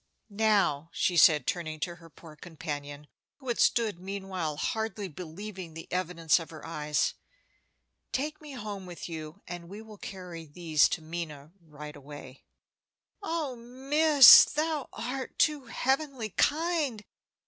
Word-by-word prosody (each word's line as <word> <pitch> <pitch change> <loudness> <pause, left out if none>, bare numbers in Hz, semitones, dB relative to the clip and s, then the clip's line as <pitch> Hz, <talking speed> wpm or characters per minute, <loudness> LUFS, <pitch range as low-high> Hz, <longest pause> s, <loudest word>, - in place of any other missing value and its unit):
"Now," 200 -8 +2
she 180 0 +1
said, 155 -5 +6
turning 155 -3 -3
to 175 +1 -3
her 165 -1 -15
poor 160 -1 -14
companion, 145 -3 -7 0.3
who 265 -3 -9
had 235 - -1
stood 220 -7 +2
meanwhile, 190 -5 -4
hardly 220 +2 -2
believing 180 +1 -8
the 165 - -8
evidence 175 -3 +1
of 165 - -8
her 155 -2 -10
eyes, 150 -2 -1 1.0
"take 300 +3 -3
me 300 -2 -10
home 205 -6 -6
with 175 -1 -8
you, 160 +2 -8
and 175 -1 -8
we 200 +2 -8
will 220 -2 -12
carry 180 -4 -8
these 155 -1 +2
to 160 - -3
Minna 155 -3 -6
right 150 -2 -10
away." 140 -2 -12 0.8
"Oh, 325 -8 -3
miss, 270 +4 +7
thou 305 -2 -2
art 255 +2 -5
too 300 -4 +2
heavenly 265 -1 -1
kind! 295 - 0
185 Hz, 135 wpm, -29 LUFS, 160-245 Hz, 1.0 s, miss